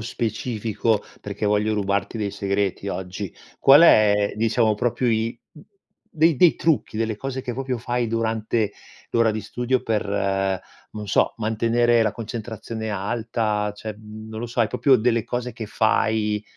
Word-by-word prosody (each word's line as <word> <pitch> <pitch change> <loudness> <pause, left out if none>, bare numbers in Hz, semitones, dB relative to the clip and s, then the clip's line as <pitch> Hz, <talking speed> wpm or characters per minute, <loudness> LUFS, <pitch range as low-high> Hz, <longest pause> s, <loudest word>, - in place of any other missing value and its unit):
specifico, 110 -1 -1 0.2
perchè 100 +1 -5
voglio 105 +1 +1
rubarti 100 +2 -1
dei 105 -2 -2
segreti 100 0 -2
oggi, 95 0 -5 0.3
qual 140 +4 +8
è 105 -9 +5
diciamo 110 0 +2
proprio 120 +3 0
i 115 +1 0 0.7
dei 160 0 +3
dei 175 +2 +5
trucchi 155 -8 0
delle 110 -1 -1
cose 135 +3 -5
che 125 - -4
proprio 130 +1 -3
fai 120 +1 -2
durante 110 -1 -1 0.4
l'ora 115 -1 +3
di 110 0 -4
studio 125 +1 -1
per, 110 -2 0 0.9
non 105 -1 -7
so, 100 - +2
mantenere 115 +2 +2
la 110 - +1
concentrazione 115 -1 -6
alta, 105 0 -1
cioè 110 0 -6
mhmm, 110 +1 -11
non 110 0 -6
lo 120 - -3
so 120 +1 -2
hai 115 - +4
proprio 135 +1 +4
delle 115 0 +1
cose 125 +1 -3
che 110 - -7
fai, 110 -1 +1
110 Hz, 150 wpm, -23 LUFS, 105-120 Hz, 0.9 s, qual